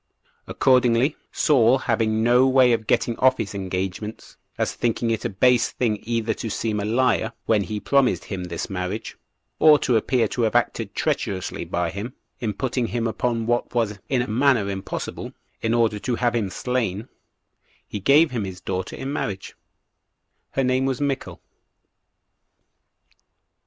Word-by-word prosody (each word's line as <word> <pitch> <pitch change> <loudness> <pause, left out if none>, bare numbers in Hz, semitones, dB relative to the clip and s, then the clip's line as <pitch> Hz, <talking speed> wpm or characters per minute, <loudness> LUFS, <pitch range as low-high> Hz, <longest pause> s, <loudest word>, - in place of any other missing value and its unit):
Accordingly, 125 +2 +3 0.2
Saul 130 -4 +4
having 110 -4 0
no 125 +3 +5
way 130 -2 +5
of 110 -2 -2
getting 120 - +1
off 130 0 +4
his 110 -3 -4
engagements, 95 +2 -5 0.2
as - - -1
thinking 115 0 -1
it 110 - -2
a - - +1
base 120 +5 +3
thing 110 -4 -1
either 115 -1 -1
to 115 - -5
seem 110 0 -2
a 100 - -2
liar 115 0 +1
when 110 -2 +3
he 105 -1 -4
promised 135 +2 +2
him 95 -3 -5
this 85 -1 -4
marriage, 95 +3 -4 0.4
or 155 -1 +7
to 125 -4 +2
appear 115 +1 +1
to 125 - -2
have 115 0 +1
acted 115 -3 0
treacherously 105 - -2
by 85 -1 -2
him, 110 +6 -6 0.2
in 110 -3 -1
putting 125 0 -1
him 120 0 -2
upon 115 0 -1
what 120 +1 -1
was 105 -4 0
in 125 -2 +2
a - - -6
manner 115 -3 +2
impossible, 95 0 -5 0.3
in 115 - 0
order 115 -3 +2
to 125 +3 -2
have 120 0 0
him 110 -5 -1
slain, 115 -1 -2 0.8
he 105 - -5
gave 145 - +4
him 120 -4 -2
his 95 -2 -6
daughter 95 0 -4
in 135 +1 -5
marriage: 100 -8 -4 1.0
her 135 - +1
name 130 +1 +1
was 135 -2 -1
Michal. 140 -2 -3
115 Hz, 160 wpm, -23 LUFS, 105-125 Hz, 1.0 s, or